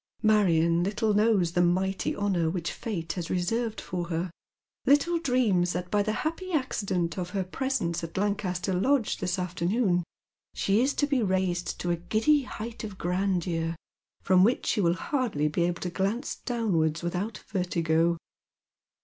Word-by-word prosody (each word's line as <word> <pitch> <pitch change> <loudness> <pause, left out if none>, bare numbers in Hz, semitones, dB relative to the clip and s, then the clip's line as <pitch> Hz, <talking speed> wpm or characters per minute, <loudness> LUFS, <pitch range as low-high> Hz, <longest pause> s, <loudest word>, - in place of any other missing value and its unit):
" - - -36
Marion 170 -6 +4
little 210 +3 0
knows 205 -5 +3
the 175 0 +2
mighty 185 +2 +1
honour 190 -5 +1
which 170 0 -2
fate 170 -7 -4
has 175 -3 -5
reserved 220 +5 -1
for 175 -1 -4
her 170 +1 -2 0.3
— - - -66
little 290 +5 +4
dreams 225 - +2
that 180 0 -4
by 210 - +3
the 215 - 0
happy 370 +4 -3
accident 195 - -1
of 175 -1 -3
her 190 - +1
presence 185 -4 -2
at 165 +2 -6
Lancaster 190 -2 -1
Lodge 240 +6 +1
this 180 +2 -1
afternoon 180 +2 0 0.5
she 200 +3 +2
is 270 +3 +1
to 290 - +2
be 280 -3 +1
raised 185 -3 0
to 175 - -1
a 170 - 0
giddy 220 - +2
height 230 -3 -7
of 210 -3 -6
grandeur, 175 -3 -1 0.5
from 185 0 +5
which 235 +5 +2
she 210 - +1
will 170 -1 +3
hardly 230 - -1
be 170 +3 +1
able 175 -1 -2
to 180 - -3
glance 205 +9 -1
downwards 175 -10 0
without 180 +6 -2
vertigo. 170 -3 +1
185 Hz, 165 wpm, -28 LUFS, 175-220 Hz, 0.5 s, from